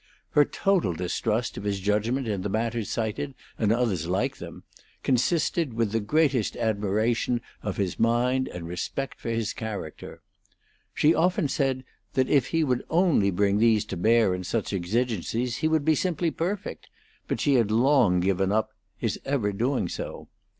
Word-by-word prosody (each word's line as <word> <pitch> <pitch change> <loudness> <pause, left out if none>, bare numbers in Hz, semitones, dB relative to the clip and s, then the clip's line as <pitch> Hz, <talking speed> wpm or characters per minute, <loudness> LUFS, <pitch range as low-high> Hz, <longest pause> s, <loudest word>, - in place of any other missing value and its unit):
Her 145 - +5
total 190 - +1
distrust 105 +7 -1
of - - -5
his 100 -1 -1
judgment 110 +6 0
in 100 -3 -1
the 100 - -3
matters 115 +1 -1
cited 115 +5 -3 0.2
and 110 -2 +2
others 110 -9 0
like 105 +10 0
them - - -9 0.4
consisted 145 +2 +1
with 115 -2 0
the 115 - +1
greatest 135 0 +1
admiration 110 +2 0 0.2
of 105 -2 -4
his 95 -3 -2
mind 125 +3 +2
and 85 -2 -7
respect 90 +10 -4
for - - -5
his 115 -2 -1
character. 105 -8 -7 0.7
She 155 +2 +4
often 180 0 +2
said 135 -2 0 0.3
that 130 -1 +1
if 135 -4 +3
he 165 -1 +1
would 125 -4 0
only 165 - +3
bring 100 +2 +2
these 110 -2 +4
to 100 - -5
bear 110 +2 +3
in 90 0 -4
such 105 +3 -2
exigencies 115 +4 -1
he 155 - +1
would 160 -2 +1
be 160 - +5
simply 170 0 0
perfect; 180 +6 -4 0.4
but - - -2
she 145 - +2
had 115 -5 +3
long 115 -5 +4
given 95 +1 +1
up 110 +1 +1 0.3
his 115 -3 -2
ever 135 -7 0
doing 125 +6 0
so. - - -6
115 Hz, 165 wpm, -26 LUFS, 100-135 Hz, 0.7 s, Her